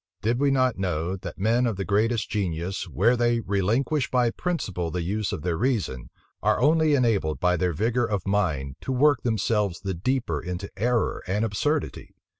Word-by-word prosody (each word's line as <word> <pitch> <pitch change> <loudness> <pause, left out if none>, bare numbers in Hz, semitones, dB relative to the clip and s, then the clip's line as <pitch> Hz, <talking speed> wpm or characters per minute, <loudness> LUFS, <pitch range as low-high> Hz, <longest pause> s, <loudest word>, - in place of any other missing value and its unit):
did 115 +3 +1
we 140 0 +3
not 130 -5 +2
know, 90 -1 -1
that 95 - -8
men 115 +5 +2
of 115 - -1
the 95 0 -3
greatest 110 +3 +1
genius, 95 -2 -3
where 115 +9 +3
they 120 -1 +2
relinquish 115 +8 0
by 125 -2 +2
principle 95 - -3
the 90 +1 -3
use 105 +4 -2
of 75 - -5
their 85 -2 0
reason, 95 - -1 0.3
are - - +2
only 155 +3 +4
enabled, 110 - +1
by 90 -1 +2
their 90 +1 0
vigor 115 +8 0
of 100 -5 -2
mind, 80 -10 0
to - - -4
work 140 +2 +3
themselves 105 -5 0
the 95 -1 -3
deeper 95 - -1
into 90 +3 -5
error 115 +3 0
and 105 +4 0
absurdity. 145 +9 -2
105 Hz, 180 wpm, -25 LUFS, 90-125 Hz, 0.3 s, only